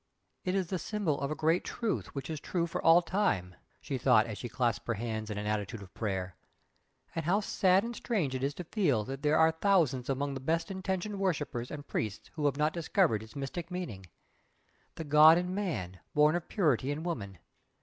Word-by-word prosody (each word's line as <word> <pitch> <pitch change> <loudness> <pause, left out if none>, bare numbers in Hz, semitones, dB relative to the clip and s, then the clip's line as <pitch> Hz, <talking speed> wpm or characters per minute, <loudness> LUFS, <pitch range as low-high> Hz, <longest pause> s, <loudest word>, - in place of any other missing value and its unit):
"It 185 +1 -1
is 190 -2 +1
the 185 - -1
Symbol 175 -6 -1
of 140 - -1
a 155 - -2
great 160 +3 +2
Truth 230 -9 -3
which 140 - -4
is 155 - -4
true 170 +2 -1
for 170 - -4
all 165 +2 +7
time" 165 - 0 0.3
she 135 - -3
thought, 120 -3 +5
as 110 -3 -5
she 120 - -5
clasped 120 -2 -1
her 115 - 0
hands 110 0 -4
in 105 - -4
an 105 - -3
attitude 105 0 -2
of 95 - -15
prayer 95 -4 -3 0.8
"And 165 - -3
how 185 +5 +3
sad 190 -2 +3
and 235 +1 -4
strange 195 - -1
it 130 0 -3
is 140 +1 -1
to 180 - -5
feel 155 - +1
that 135 +5 -6
there 150 +1 +3
are 160 0 +5
thousands 160 -8 +2
among 140 +1 -1
its 135 - -4
best 165 +6 0
intentioned 190 +1 -3
worshippers 145 -10 -1
and 145 -1 -7
priests 105 -2 -4
who 150 -3 -3
have 140 -1 0
not 150 +1 +1
discovered 170 - +2
its 110 0 -13
mystic 145 +5 -5
meaning. 160 - -5 0.9
The 160 - -5
God 155 +2 +7
in 180 +1 -1
Man, 150 - -3 0.2
born 150 +2 +5
of 175 - -3
purity 145 - +1
in 145 +2 -3
woman! 105 - -4
150 Hz, 210 wpm, -31 LUFS, 120-180 Hz, 0.9 s, all